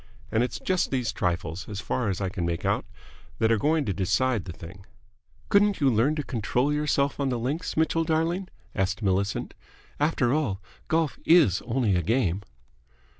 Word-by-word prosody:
And 110 Hz, -, +2 dB
it's 125 Hz, -, -2 dB
just 185 Hz, -1 st, 0 dB
these 125 Hz, -5 st, -1 dB
trifles, 90 Hz, -1 st, -2 dB
as 100 Hz, -2 st, -5 dB
far 110 Hz, +1 st, -1 dB
as 95 Hz, -, -2 dB
I 95 Hz, -, 0 dB
can 90 Hz, -2 st, -4 dB
make 85 Hz, 0 st, -2 dB
out, -, -, +1 dB, 0.5 s
that 110 Hz, 0 st, +2 dB
are 115 Hz, -, +3 dB
going 150 Hz, +5 st, +2 dB
to 100 Hz, -, -1 dB
decide 105 Hz, +4 st, +1 dB
the 90 Hz, -, -6 dB
thing." 90 Hz, +3 st, -11 dB, 0.7 s
"Couldn't 205 Hz, 0 st, +4 dB
you 140 Hz, -3 st, +4 dB
learn 120 Hz, +7 st, +2 dB
to 150 Hz, -, -2 dB
control 125 Hz, +4 st, 0 dB
yourself 145 Hz, -2 st, 0 dB
on 140 Hz, -1 st, +1 dB
the 125 Hz, -, 0 dB
links, 140 Hz, +10 st, -3 dB
Mitchell, 160 Hz, +1 st, +2 dB
darling?" 165 Hz, +4 st, 0 dB, 0.3 s
asked 95 Hz, +2 st, -1 dB
Millicent. 100 Hz, +1 st, 0 dB, 0.5 s
"After 145 Hz, -5 st, +2 dB
all, 130 Hz, -11 st, 0 dB, 0.3 s
golf 160 Hz, -2 st, 0 dB
is 155 Hz, -, +5 dB
only 115 Hz, -5 st, +1 dB
a 90 Hz, -, +2 dB
game!" 100 Hz, -1 st, +1 dB
120 Hz, 175 wpm, -26 LUFS, 95-150 Hz, 0.7 s, is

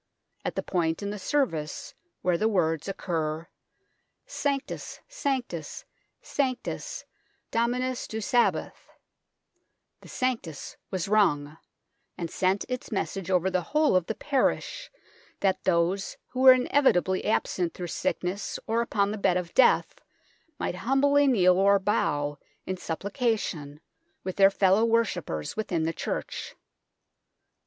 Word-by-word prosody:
At -, -, -3 dB
the -, -, -2 dB
point 165 Hz, 0 st, -1 dB
in 200 Hz, -, -2 dB
the 210 Hz, -, -5 dB
service 175 Hz, -, -1 dB, 0.3 s
where 180 Hz, -1 st, +2 dB
the 215 Hz, +6 st, +1 dB
words 165 Hz, -6 st, +1 dB
occur, 165 Hz, -4 st, -2 dB, 0.4 s
" -, -, -48 dB, 0.2 s
Sanctus, 280 Hz, -1 st, -2 dB
Sanctus, 265 Hz, -, -3 dB, 0.4 s
Sanctus, 280 Hz, -, -3 dB, 0.5 s
Dominus 245 Hz, +2 st, 0 dB
Deus 220 Hz, -2 st, -4 dB
Sabaoth," 245 Hz, -1 st, +1 dB, 1.1 s
the -, -, -14 dB
Sanctus 230 Hz, -, -3 dB
was 185 Hz, -2 st, -2 dB
rung, 155 Hz, -8 st, +2 dB, 0.6 s
and 170 Hz, -2 st, -4 dB
sent 190 Hz, +2 st, +1 dB
its 250 Hz, 0 st, -5 dB
message 195 Hz, -3 st, -3 dB
over 185 Hz, 0 st, +2 dB
the 185 Hz, -1 st, +1 dB
whole 300 Hz, -, +2 dB
of 185 Hz, -2 st, +2 dB
the 225 Hz, -, -2 dB
parish, 295 Hz, -, -1 dB, 0.5 s
that 195 Hz, -2 st, +1 dB
those 185 Hz, +2 st, +1 dB
who 255 Hz, -, -6 dB
were 260 Hz, 0 st, +10 dB
in 255 Hz, -1 st, 0 dB
evitably 190 Hz, -10 st, +3 dB
absent 180 Hz, -5 st, 0 dB
through 180 Hz, -, -5 dB
sickness 180 Hz, +3 st, -2 dB
or 225 Hz, +1 st, +1 dB
upon 205 Hz, -3 st, 0 dB
the 215 Hz, -, -4 dB
bed 185 Hz, -2 st, +3 dB
of 175 Hz, -2 st, -4 dB
death 260 Hz, -, +4 dB, 0.6 s
might 180 Hz, -, -3 dB
humbly 280 Hz, +6 st, +3 dB
kneel 185 Hz, -8 st, +5 dB
or 200 Hz, +1 st, +5 dB
bow 145 Hz, -7 st, 0 dB, 0.3 s
in 185 Hz, -, -2 dB
supplica 205 Hz, -, -1 dB
tion 145 Hz, -7 st, -6 dB, 0.4 s
with 185 Hz, 0 st, -4 dB
their 195 Hz, -1 st, +7 dB
fellow 195 Hz, +2 st, +3 dB
worshippers 205 Hz, -, 0 dB
within 180 Hz, -7 st, -1 dB
the 165 Hz, +1 st, -1 dB
church. -, -, -4 dB
195 Hz, 130 wpm, -27 LUFS, 175-245 Hz, 1.1 s, were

